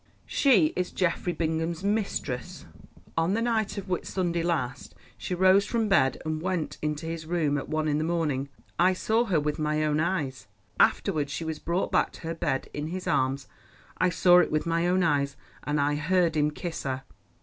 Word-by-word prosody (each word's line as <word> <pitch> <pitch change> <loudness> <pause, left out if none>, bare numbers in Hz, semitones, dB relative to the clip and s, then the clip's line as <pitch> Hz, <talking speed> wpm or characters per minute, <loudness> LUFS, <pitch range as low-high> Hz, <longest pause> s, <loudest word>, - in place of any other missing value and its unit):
"She 200 - +3
is 180 0 -1
Geoffrey 175 -1 0
Bingham's 165 +1 -2
mistress. 200 - -2 0.5
On 165 +4 +1
the 225 - 0
night 220 -3 0
of 200 - -5
Whit 180 -1 -2
Sunday 175 -3 -1
last 150 -7 -2 0.2
she 180 - -4
rose 190 +2 +5
from 230 -2 0
bed 135 -10 +3
and 155 0 -2
went 180 -3 -2
into 150 +1 -2
his 165 -1 -5
room 160 -4 +1
at 140 - -3
one 155 0 0
in 150 0 +1
the - - 0
morning. 155 -5 -1 0.3
I 185 +2 +5
saw 220 +5 +1
her 185 -8 +2
with 150 +1 -2
my 155 0 0
own 150 0 +1
eyes. 140 - -2 0.3
Afterwards 150 -8 +2
she 165 +3 -4
was 160 -1 -4
brought 175 +3 -1
back - - +2
to - - -12
her 165 0 -3
bed 135 -5 -2
in 150 +1 -3
his 180 +3 -5
arms—I 135 +6 -2
saw 180 0 +5
it 180 - +3
with 155 +1 0
my 170 +1 +1
own 180 +1 +2
eyes, 140 -4 +1 0.3
and 145 0 0
I 145 +1 +2
heard 165 +2 +1
him 150 -1 +3
kiss 165 +2 -5
her." 130 -1 -3
165 Hz, 195 wpm, -27 LUFS, 150-180 Hz, 0.5 s, rose